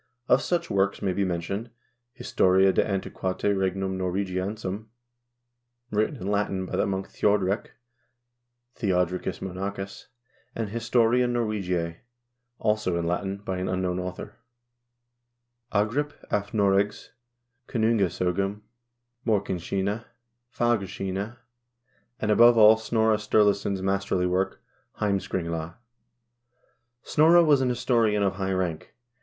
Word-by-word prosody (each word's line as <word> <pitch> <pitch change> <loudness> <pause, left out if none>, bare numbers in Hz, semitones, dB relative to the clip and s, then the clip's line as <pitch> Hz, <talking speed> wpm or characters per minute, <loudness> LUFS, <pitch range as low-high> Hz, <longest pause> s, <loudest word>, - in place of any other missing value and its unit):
Of 125 +2 +4
such 175 +3 -1
works 100 0 +1
may 95 -2 +1
be 100 - 0
mentioned: 95 +5 -3 0.4
"Historia 95 -4 +3
de - - +3
Anti 100 -2 -3
qnitate 95 +2 -1
Regum 95 0 -1
Norwagiensium," 95 +3 -3 1.0
written 110 +7 0
in 105 - -8
Latin 100 -2 0
by - - -5
the - - +1
monk 95 0 -2
Thjodrek 100 0 +1 1.1
(Theodricus 90 -4 -1
Monachus), 95 +1 -5 0.5
and 110 -3 -3
"Historia 115 +2 +2
Norwegiae," 95 -8 -1 0.6
also 105 -6 0
in 85 - -1
Latin, 95 +3 -2
by 95 -1 -2
an 95 - -2
unknown 90 -1 -1
author; 90 0 -6 0.7
" 120 0 -53
Agrip 115 +9 0 0.2
af 105 0 -1
Noregs 100 -1 +1 0.6
Konungas0gum," 100 -3 0 0.6
"Morkinskinna," 100 0 -1 0.5
"Fagrskinna," 100 -1 -1 0.8
and, 105 -3 0
above 120 +2 +7
all, 110 0 +8
Snorre 110 -1 +1
Sturlason's 100 -2 +1
masterly 95 -1 0
work, 95 +1 -1 0.4
"Heimskringla." 85 -5 -2 1.3
Snorre 165 +3 +5
was 145 -3 +4
an 130 - +1
historian 115 -4 +2
of 95 -1 0
high 95 -1 -1
rank. 90 -4 -3
100 Hz, 110 wpm, -26 LUFS, 95-110 Hz, 1.3 s, all